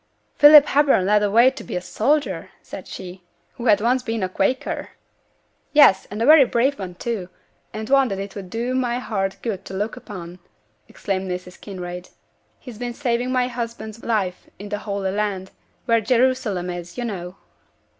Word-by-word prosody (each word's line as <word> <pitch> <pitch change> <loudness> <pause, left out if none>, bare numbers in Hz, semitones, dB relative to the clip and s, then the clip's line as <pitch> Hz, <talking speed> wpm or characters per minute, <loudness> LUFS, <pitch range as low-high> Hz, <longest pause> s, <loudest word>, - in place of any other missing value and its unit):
'Philip 295 0 +9
Hepburn 280 -11 +3
led 210 +1 +3
away 230 +5 +5
to 265 - -10
be - - -6
a - - 0
soldier!' 270 +11 -1
said - - -9
she, 185 0 -9 0.3
'who 240 - -5
had 205 -2 +5
once 250 +3 +2
been 225 -4 -3
a 185 - -1
Quaker?' 195 +7 -1 0.8
'Yes, 285 -11 +6
and 205 - -6
a 230 - +1
very 305 0 +8
brave 255 +2 0
one 180 -2 -6
too, 200 -3 -4 0.4
and 215 0 -6
one 275 0 +4
that 195 - -3
it 195 0 -6
would 195 -3 -8
do 235 +5 -2
my 245 -2 0
heart 195 -6 -3
good 210 -5 -3
to 190 - -7
look 210 +4 -2
upon,' 185 -7 -9 0.5
exclaimed 190 -1 -4
Mrs. 180 0 -6
Kinraid. 180 -2 -7 0.5
'He's 245 -5 -11
been 240 -1 -4
saving 245 -2 -1
my 250 -1 +1
husband's 230 -2 -6
life 195 -6 -2
in 205 +1 -9
the 205 0 -3
Holy 200 -2 -3
Land, 200 -2 -2 0.3
where 230 -2 +3
Jerusalem 230 -6 +1
is, 175 +2 -8
you 245 - -2
know.' 180 -5 -6
215 Hz, 175 wpm, -22 LUFS, 190-245 Hz, 0.8 s, Philip